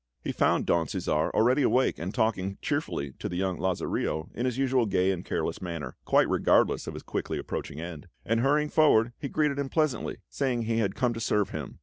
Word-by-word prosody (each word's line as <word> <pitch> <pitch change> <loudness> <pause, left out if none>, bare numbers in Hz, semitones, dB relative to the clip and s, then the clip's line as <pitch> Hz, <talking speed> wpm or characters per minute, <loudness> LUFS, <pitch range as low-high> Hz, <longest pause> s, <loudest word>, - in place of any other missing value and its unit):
He - - -2
found - - +2
Don 85 -2 +2
Cæsar 75 +2 0
already 125 +6 +3
awake 130 0 +2
and 90 +3 -3
talking 100 -4 0
cheerfully 70 -1 -2
to - - -3
the 90 - -5
young 95 -1 -1
Lazarillo 85 -3 -1
in 125 - -1
his 125 -1 -2
usual 130 -3 +2
gay 95 -1 +2
and 90 -2 -3
careless - - -2
manner, 85 -4 -5
quite - - +4
regardless - - +2
of - - -5
his - - -8
quickly - - -3
approaching 75 - -5
end; 80 -3 -7 0.2
and 115 +1 +1
hurrying 150 +4 +2
forward, 120 -8 +4
he 140 - -4
greeted 150 -1 +1
him 140 -1 -2
pleasantly, 155 -7 0
saying 125 -4 -1
he 115 0 0
had 100 -4 0
come 125 -2 +1
to 115 - -5
serve 105 -2 +1
him. - - -6
115 Hz, 210 wpm, -28 LUFS, 90-130 Hz, 0.2 s, quite